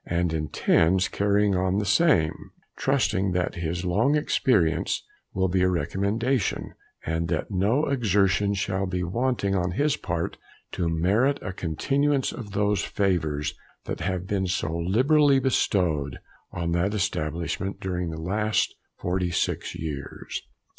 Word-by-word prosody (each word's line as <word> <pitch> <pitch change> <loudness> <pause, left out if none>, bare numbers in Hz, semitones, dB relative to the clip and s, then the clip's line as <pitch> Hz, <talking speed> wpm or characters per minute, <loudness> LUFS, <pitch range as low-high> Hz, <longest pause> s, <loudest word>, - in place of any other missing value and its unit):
and 85 -1 0
intends 80 +3 +2
carrying 100 0 +2
on 95 +1 +1
the 105 - 0
same, 100 - +2 0.3
trusting 105 -8 +1
that 90 0 0
his 85 +2 -3
long 110 +11 +2
experience 90 - +1 0.3
will 95 0 +1
be 90 0 +1
a 95 - +4
recommendation, 100 +6 -1 0.3
and 80 +1 -1
that 85 +5 -2
no 105 +10 +2
exertion 100 -6 +2
shall 95 0 -1
be 90 -1 -2
wanting 100 +1 0
on 90 -2 +1
his 145 +7 +2
part 85 -1 -3 0.3
to 85 -2 -1
merit 100 - +2
a 95 - -4
continuance 135 - 0
of 105 -5 -8
those 105 -1 +1
favours 80 -7 0 0.3
that - - -5
have 90 +1 -2
been 95 -1 -1
so 85 -3 -1
liberally 135 - +4
bestowed 85 - +1 0.3
on 85 -1 -2
that 90 +5 +1
establishment 85 -1 -2
during 90 -2 -2
the 80 - -5
last 105 +6 0 0.2
46 90 -1 -1
years. 75 -4 -5
95 Hz, 135 wpm, -26 LUFS, 85-105 Hz, 0.3 s, a